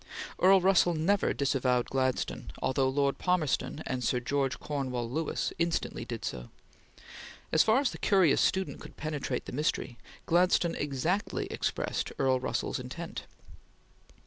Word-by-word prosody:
Earl 190 0 +6
Russell 180 -2 +4
never 185 +6 +2
disavowed 130 -3 +1
Gladstone, 130 -1 -1
although 130 0 +1
Lord 140 +1 0
Palmerston 160 -3 0
and 130 -1 -3
Sir 125 +2 +1
George 135 +2 -1
Cornewall 130 -5 -3
Lewis 155 +7 -2
instantly 170 0 -1
did - - -5
so. - - -5 1.0
As 160 - +5
far 225 +4 +4
as 285 - +1
the - - -9
curious 190 -7 +4
student 190 0 0
could - - -12
penetrate 155 -3 -3
the - - -7
mystery, 130 -3 -2 0.3
Gladstone 175 0 +3
exactly 150 +8 -1
expressed - - -2
Earl 130 -1 +2
Russell's 130 - -2
intent. 135 +7 -7
145 Hz, 135 wpm, -30 LUFS, 130-175 Hz, 1.0 s, Earl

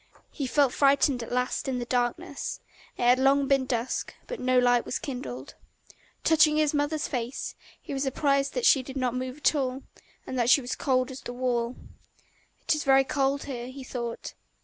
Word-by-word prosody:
He 280 -4 -4
felt 275 -1 +2
frightened 275 -2 +3
at 230 - -7
last 250 +2 -1
in 260 -1 -1
the 240 - -3
darkness: 245 +3 -2 0.4
it - - -2
had 245 +1 +5
long 275 +1 +3
been 270 -1 +2
dusk, 240 0 -2
but - - -6
no 255 0 +2
light 245 -1 +4
was - - -3
kindled. 140 - -6 0.7
Touching 315 -1 +4
his 305 -1 +2
mother's 295 +1 0
face, 250 -1 -4 0.3
he - - -8
was 270 - -2
surprised 275 0 +1
that - - 0
she 275 - +6
did 265 +1 -8
not 255 -2 0
move 255 +1 -4
at 300 - +3
all, 265 -2 -2 0.4
and 260 - -4
that 240 0 +2
she 280 - +7
was 250 -1 -6
as - - -1
cold 255 -1 0
as 260 -1 -8
the 245 - -7
wall. 245 -1 -1 0.9
"It - - +2
is 305 - -2
very 270 0 +5
cold 275 +1 0
here," 245 -3 -6
he 260 +1 -9
thought. 235 -2 -5
260 Hz, 195 wpm, -27 LUFS, 245-280 Hz, 0.9 s, she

